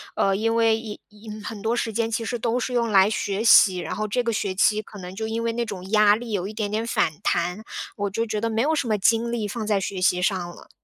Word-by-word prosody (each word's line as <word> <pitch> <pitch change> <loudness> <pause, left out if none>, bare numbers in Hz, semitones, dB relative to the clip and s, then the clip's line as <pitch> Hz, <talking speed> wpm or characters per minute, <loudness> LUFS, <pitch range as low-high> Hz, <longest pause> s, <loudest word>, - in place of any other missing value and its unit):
呃， 195 0 +2
因 225 +1 0
为 225 -1 +3
因 220 -2 -8
因 210 0 -10
很 210 -1 -7
多 225 +2 +1
时 230 -1 -1
间 225 +1 -1
其 230 +1 -1
实 240 - -2
都 230 +2 -1
是 250 - -3
用 235 -2 +1
来 195 0 +5
学 205 -1 -2
习， 195 -5 +6
然 180 - -4
后 215 0 -2
这 245 +4 0
个 235 - 0
学 200 -2 -2
期 210 +3 +2
可 205 -1 -12
能 180 +1 -8
就 220 +2 -3
因 225 +1 -2
为 230 - 0
那 235 +1 -2
种 190 -3 -7
压 210 -1 +5
力 230 0 -7
有 195 -2 -2
一 210 - -7
点 215 -2 -3
点 215 +2 -2
反 230 - +1
弹， 180 +5 -1 0.3
我 205 -1 -2
就 225 +4 -1
觉 215 -2 -3
得 230 +1 -1
没 220 +1 0
有 310 +5 +1
什 270 -5 -1
么 215 - +1
精 230 +3 +2
力 225 -3 -2
放 220 +2 -4
在 210 -2 +1
学 190 0 -4
习 180 0 +2
上 190 +1 +1
了。 - - -15
215 Hz, 300 characters per minute, -24 LUFS, 200-230 Hz, 0.3 s, 习